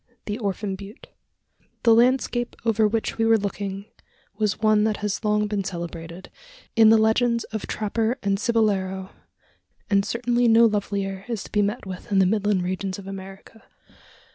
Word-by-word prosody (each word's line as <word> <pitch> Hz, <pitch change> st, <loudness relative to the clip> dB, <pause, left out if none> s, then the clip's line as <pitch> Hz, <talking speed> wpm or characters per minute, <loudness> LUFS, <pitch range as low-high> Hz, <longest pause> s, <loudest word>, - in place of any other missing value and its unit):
THE 210 Hz, +2 st, -4 dB
ORPHAN 200 Hz, -2 st, -3 dB
BUTTE. 200 Hz, +3 st, -12 dB, 0.7 s
The 230 Hz, -, +6 dB
landscape 240 Hz, 0 st, +2 dB
over 220 Hz, -1 st, +3 dB
which 225 Hz, +1 st, -2 dB
we 225 Hz, -, +3 dB
were 225 Hz, 0 st, +5 dB
looking 200 Hz, -1 st, -4 dB, 0.5 s
was 210 Hz, -1 st, -1 dB
one 215 Hz, -1 st, +3 dB
that 215 Hz, -1 st, 0 dB
has 210 Hz, -1 st, -3 dB
long 210 Hz, 0 st, +2 dB
been 205 Hz, -1 st, -2 dB
celebrated, 170 Hz, -1 st, -7 dB, 0.4 s
in 225 Hz, -1 st, +7 dB
the 225 Hz, -, +7 dB
legends 230 Hz, +2 st, +2 dB
of 220 Hz, -, -4 dB
trapper 220 Hz, +3 st, -1 dB
and 195 Hz, -1 st, 0 dB
cibolero, 195 Hz, -5 st, 0 dB, 0.8 s
and 200 Hz, -1 st, +4 dB
certainly 240 Hz, +2 st, 0 dB
no 230 Hz, +1 st, +6 dB
lovelier 200 Hz, -2 st, -1 dB
is 230 Hz, -5 st, -3 dB
to -, -, -13 dB
be 210 Hz, -, +2 dB
met 205 Hz, +3 st, -2 dB
with 185 Hz, +1 st, -8 dB
in 200 Hz, -, +2 dB
the 190 Hz, -, +5 dB
midland 205 Hz, -1 st, +1 dB
regions 185 Hz, +1 st, -3 dB
of 200 Hz, -, -10 dB
America. 195 Hz, +3 st, -10 dB
210 Hz, 165 wpm, -24 LUFS, 195-225 Hz, 0.8 s, in